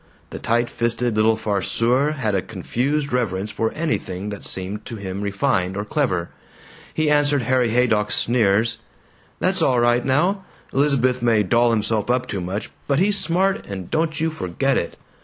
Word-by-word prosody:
The - - -6
tight 120 +1 +1
fisted 120 0 -1
little 110 +1 +3
farceur 115 +7 +1
had 115 -8 -2
a 95 - +1
confused 140 - -2
reverence 105 -4 -1
for 110 0 -1
anything 105 - -3
that 100 -1 -7
seemed 95 +3 -4
to 115 - -6
him 100 -2 -5
refined 100 -2 0
or 105 - -3
clever. 105 - -1 0.6
He 155 -1 +1
answered 145 -2 +3
Harry 125 0 +2
Haydock's 110 -3 +2
sneers, 115 -1 +2 0.6
"That's 185 -1 0
all 130 -5 +3
right 120 0 +3
now! 180 +9 +1 0.3
Elizabeth 130 -3 +2
may 115 -3 +3
doll 120 +5 +3
himself 110 -1 0
up 125 +1 +1
too 100 -6 -4
much, 95 +5 -4 0.2
but 140 - +2
he's 200 +4 +3
smart, 190 +2 +1
and 95 -3 -7
don't 160 -1 0
you 160 +1 0
forget 135 - -1
it! 85 - -2
120 Hz, 165 wpm, -22 LUFS, 105-140 Hz, 0.6 s, little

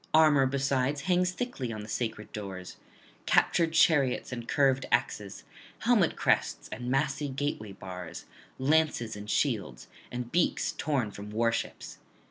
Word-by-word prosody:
Armour 150 -4 +6
besides 135 +1 0
hangs 180 +3 +2
thickly 185 - -4
on 110 -2 -5
the - - -9
sacred 110 -1 -3
doors, 95 -3 -7 0.5
captured 165 -2 +3
chariots 150 -8 +3
and 120 -2 -5
curved 135 -1 +2
axes, 105 -4 -1 0.4
helmet - - +3
crests - - +1
and 125 0 -5
massy 135 +2 0
gateway 130 -7 -3
bars, 90 -3 -8 0.3
lances 135 -5 +1
and 105 0 -8
shields, - - -1 0.2
and 120 0 -5
beaks 175 - +1
torn 135 -9 -1
from 100 +1 -8
warships. 115 +2 -2
130 Hz, 130 wpm, -29 LUFS, 110-145 Hz, 0.5 s, Armour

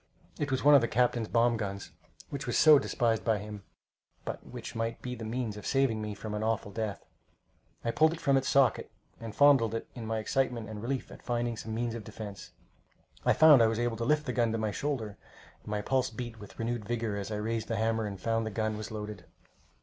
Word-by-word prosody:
It 145 - -1
was 130 -1 -1
one 145 +1 +7
of 140 - +8
the 115 - +1
captain's 120 -1 +1
bomb 115 +1 +3
guns, 100 -5 -5 0.4
which 140 - -5
was 120 - +1
so 155 -2 +8
despised 115 -5 0
by 110 -2 +2
him, 105 0 -7 0.6
but - - -5
which - - -8
might 115 0 -2
be 125 - -5
the 115 -2 -7
means 110 -1 -3
of 105 - -7
saving 135 -5 +2
me 105 -1 -4
from 105 +1 -6
an 105 - -2
awful 110 -2 -1
death. 110 -1 -4 0.8
I 115 - +1
pulled 155 +4 +4
it 165 - -7
from 140 - +2
its 135 -1 +1
socket, 135 -4 +3 0.3
and 115 -2 -7
fondled 135 -6 +5
it 115 - -4
in 115 -3 -7
my 110 0 -1
excitement 120 0 -1
and 105 -1 -6
relief 130 +3 -3
at - - -12
finding 120 -1 -1
some 110 0 -6
means 120 0 -1
of 115 -2 -6
defence. 100 -1 -8 0.8
I - - +6
found 155 -5 +8
I 115 - +6
was 110 0 -1
able 120 -1 0
to 115 - -2
lift 150 +5 +2
the 125 - -2
gun 120 -2 +2
to - - 0
my 110 -1 -1
shoulder, 110 -5 -3 0.4
and - - -24
my 105 0 -2
pulse 130 +1 +1
beat 115 0 -7
with 100 - -12
renewed 115 0 -2
vigor 115 -1 -2
as 100 0 -4
I - - -1
raised 110 +2 -2
the 115 - -1
hammer 110 0 0
and 100 -2 -6
found 115 +3 0
the 110 - -3
gun 110 0 -2
was 110 0 -6
loaded. 105 -4 -6
115 Hz, 235 wpm, -30 LUFS, 110-125 Hz, 0.8 s, of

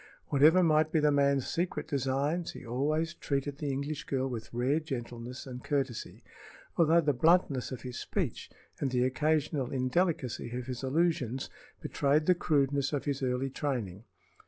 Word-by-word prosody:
Whatever 155 +6 +6
might 155 -1 +3
be 160 - +3
the 150 0 +4
man's 140 -2 +3
secret 175 +2 -2
designs, 140 +5 -1
he - - -10
always 155 +7 0
treated 140 -2 -3
the 150 - -2
English 140 +2 -3
girl 135 -1 -1
with 115 -4 -6
rare 125 +6 +1
gentleness 125 -4 -6
and 125 -1 -8
courtesy, 135 -5 -2 0.5
although 170 0 +5
the 145 -2 +2
bluntness 150 -2 +3
of 130 - -6
his 125 -1 -6
speech - - -3 0.3
and 140 - 0
the 125 -1 +1
occasional 150 0 0
indelicacy 130 -3 -1
of 125 - -5
his 125 -1 -5
allusions 135 -3 0 0.3
betrayed 145 +2 +1
the 180 - +6
crudeness 140 -4 +1
of 145 - -1
his 140 -2 -1
early 130 +1 -1
training. 115 -10 -3
140 Hz, 160 wpm, -30 LUFS, 130-155 Hz, 0.5 s, Whatever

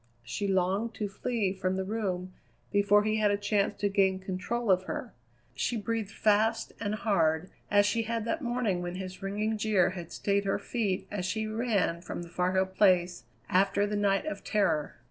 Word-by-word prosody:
She 200 - -3
longed 195 +4 +1
to 210 - -2
flee 200 -1 -1
from 190 -1 -1
the 190 - -1
room 190 -3 -3 0.4
before 205 0 +4
he 215 +1 +1
had 210 -1 +3
a 205 - +2
chance 205 0 +1
to 205 - 0
gain 195 -1 +2
control 190 +4 -2
of 185 0 +3
her. - - -5 0.4
She 185 - -1
breathed 220 -1 -2
fast 220 +2 +1
and 210 -1 -1
hard, 170 -6 +1 0.2
as 205 0 +5
she 230 +3 +1
had 225 0 -2
that 320 +7 -1
morning 240 -7 0
when 175 0 -4
his 185 +1 -7
ringing 210 +3 -1
jeer 205 -4 +3
had 175 -3 -8
stayed 200 0 0
her 195 - +1
feet 205 -6 -2
as 190 -3 -2
she 220 +2 -1
ran 215 -6 0
from 175 0 -6
the 170 - -11
Far 180 +1 0
Hill 190 0 +3
Place 185 -2 +2 0.2
after 195 +2 +3
the 210 0 -2
night 200 +3 +2
of 310 - -5
terror. 165 -8 +1
200 Hz, 190 wpm, -29 LUFS, 185-215 Hz, 0.4 s, as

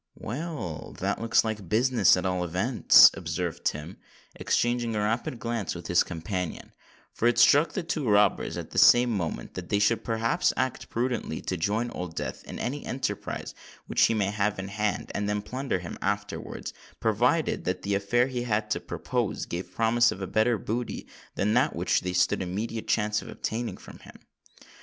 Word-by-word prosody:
"Well—that 130 - -4
looks 115 -1 +3
like 105 -5 -4
business, 115 -3 +4
at 90 - -3
all 90 -1 0
events," 95 +9 +6
observed - - -4
Tim, 75 +5 -3 0.4
exchanging 120 -1 0
a - - 0
rapid 110 +4 -1
glance 115 -5 -3
with 85 - -8
his 90 - +3
companion; 90 0 -4 0.4
for 120 - +1
it 120 - +2
struck 145 +6 +5
the 190 - -2
two 155 -6 -2
robbers 105 -1 +3
at - - -7
the - - +1
same 120 0 +6
moment, 90 -7 -3
that 90 -1 -7
they 100 - +2
should 110 +2 +2
perhaps 115 0 +1
act 130 -1 -2
prudently 120 -8 -2
to 95 - -3
join 105 +8 -1
Old 90 -2 -6
Death - - -5
in - - -7
any 140 +4 -3
enterprise 125 -6 -4 0.3
which - - 0
he 115 - +1
might 100 -2 0
have 105 0 0
in 95 0 -5
hand, 105 +1 -2
and 105 0 -2
then 105 0 -1
plunder 130 -1 -2
him 90 -1 -8
afterwards—provided 100 0 -1
that 90 0 -2
the 100 - -1
affair 100 +5 +2
he 130 -2 -3
had 110 -2 -1
to - - +1
propose, - - -3
gave 90 +2 -5
promise 120 +2 +3
of - - -6
a 95 - -3
better 110 +4 +2
booty 115 +4 -4 0.3
than 105 +2 +1
that - - +2
which - - +1
they 90 0 -3
stood 90 - +2
the - - -2
immediate 110 +5 -4
chance 105 -1 +1
of - - -11
obtaining 115 +2 -4
from - - -13
him. - - -14
105 Hz, 180 wpm, -27 LUFS, 95-120 Hz, 0.4 s, events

